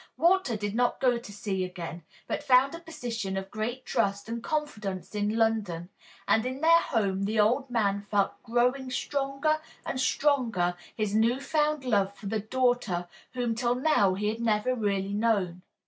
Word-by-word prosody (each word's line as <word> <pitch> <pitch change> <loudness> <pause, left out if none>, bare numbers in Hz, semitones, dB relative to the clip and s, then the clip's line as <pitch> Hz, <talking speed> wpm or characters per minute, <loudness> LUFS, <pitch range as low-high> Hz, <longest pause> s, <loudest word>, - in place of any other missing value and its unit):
Walter 340 - +3
did 205 -1 -3
not 245 +1 +1
go 250 -2 +3
to 235 - -11
sea 195 -2 -2
again, 175 -2 -6 0.2
but - - -2
found 260 +2 +4
a 335 - -6
position 230 - -4
of 195 0 -5
great 235 +4 -3
trust 200 +1 0
and 230 +1 -4
confidence 220 - -3
in 210 +1 0
London, 210 -7 0 0.4
and 220 - +4
in 260 +2 -4
their 335 +1 +6
home 200 - 0
the 215 +2 0
old 250 +6 +3
man 200 -4 +1
felt 200 -2 0
growing 250 +3 +1
stronger 280 +4 -1 0.2
and 260 - -3
stronger 235 -12 +1 0.2
his 215 -2 -1
new 230 +4 +3
found 300 0 0
love 200 -4 +1
for 200 +1 -13
the 215 +2 -1
daughter 220 -6 0 0.3
whom 245 -2 0
till 240 +1 0
now 250 -9 +3
he 210 +2 -1
had 225 +2 -4
never 225 +2 +1
really 200 -4 -1
known. 205 -5 +1
225 Hz, 170 wpm, -28 LUFS, 200-255 Hz, 0.4 s, their